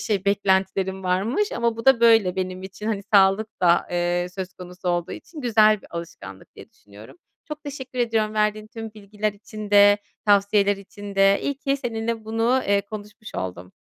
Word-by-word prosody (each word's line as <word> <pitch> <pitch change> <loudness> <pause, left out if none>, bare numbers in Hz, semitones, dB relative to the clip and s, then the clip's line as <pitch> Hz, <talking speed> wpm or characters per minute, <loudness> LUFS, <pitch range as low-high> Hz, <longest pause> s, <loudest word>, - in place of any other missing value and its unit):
şey 205 -4 -1
beklentilerim 190 -1 0
varmış 215 - 0
ama 235 -1 0
bu 230 - -7
da 265 -3 +6
böyle 225 -6 +5
benim 185 0 -3
için. 200 +3 -8
Hani, 210 -3 -1
sağlık 195 +2 +4
da, 175 0 +4
eee, 175 0 0
söz 190 -1 -5
konusu 180 0 -7
olduğu 175 -1 -1
için 320 -1 -10
güzel 215 -4 +4
bir - - -14
alışkanlık 165 - -9
diye - - -13
düşünüyorum. 105 +1 -16 0.3
Çok 300 0 -8
teşekkür 260 -3 -7
ediyorum 220 -2 0
verdiğin 215 0 0
tüm 225 -1 -9
bilgiler 210 0 -3
için 210 0 -9
de, 205 0 +6 0.3
tavsiyeler 205 0 +3
için 200 +1 -10
de. 195 0 +4
İyi 280 -1 -2
ki 275 -1 0
seninle 225 -3 -3
bunu, 230 +4 +1
eee, 200 0 +3
konuşmuş 215 0 -9
oldum. 90 0 -6
205 Hz, 175 wpm, -23 LUFS, 190-225 Hz, 0.3 s, da